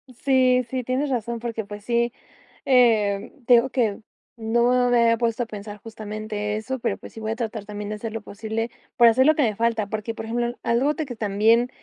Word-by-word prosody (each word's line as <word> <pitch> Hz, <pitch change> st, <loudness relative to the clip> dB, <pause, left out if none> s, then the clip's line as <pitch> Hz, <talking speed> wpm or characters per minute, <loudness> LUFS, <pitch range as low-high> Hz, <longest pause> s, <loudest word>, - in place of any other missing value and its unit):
Sí, 255 Hz, -1 st, +3 dB
sí, 255 Hz, 0 st, -2 dB
tienes 260 Hz, +4 st, -1 dB
razón, 235 Hz, -2 st, -2 dB
porque, 230 Hz, -2 st, -4 dB
pues, 205 Hz, 0 st, -9 dB
sí 235 Hz, +1 st, 0 dB, 0.5 s
eh, 220 Hz, -6 st, +3 dB
te 245 Hz, -, +7 dB
digo 240 Hz, +3 st, +3 dB
que 230 Hz, -6 st, 0 dB, 0.4 s
no 240 Hz, +2 st, +2 dB
me 240 Hz, -, +4 dB
había 230 Hz, 0 st, +4 dB
puesto 235 Hz, 0 st, 0 dB
a -, -, -5 dB
pensar 210 Hz, -1 st, -8 dB
justamente 215 Hz, -1 st, -5 dB
eso, 255 Hz, +5 st, -4 dB
pero, -, -, -1 dB
pues, -, -, -12 dB
sí -, -, -9 dB
voy 220 Hz, 0 st, -3 dB
a 225 Hz, -, -2 dB
tratar 225 Hz, -3 st, -4 dB
también 210 Hz, 0 st, -6 dB
de 215 Hz, -, -3 dB
hacer 220 Hz, +1 st, -6 dB
lo 225 Hz, -, -4 dB
posible 220 Hz, +3 st, -4 dB, 0.2 s
por 235 Hz, -, +7 dB
hacer 260 Hz, +3 st, +3 dB
lo 310 Hz, +1 st, +5 dB
que 300 Hz, -, +2 dB
me 215 Hz, -4 st, +1 dB
falta. 225 Hz, -3 st, 0 dB
Porque, 215 Hz, +2 st, -4 dB
por -, -, -6 dB
ejemplo, 240 Hz, +1 st, -2 dB
algo 255 Hz, +6 st, +2 dB
de 315 Hz, 0 st, -3 dB
que 250 Hz, -3 st, -7 dB
también, 220 Hz, +4 st, +3 dB
230 Hz, 220 wpm, -24 LUFS, 215-245 Hz, 0.5 s, te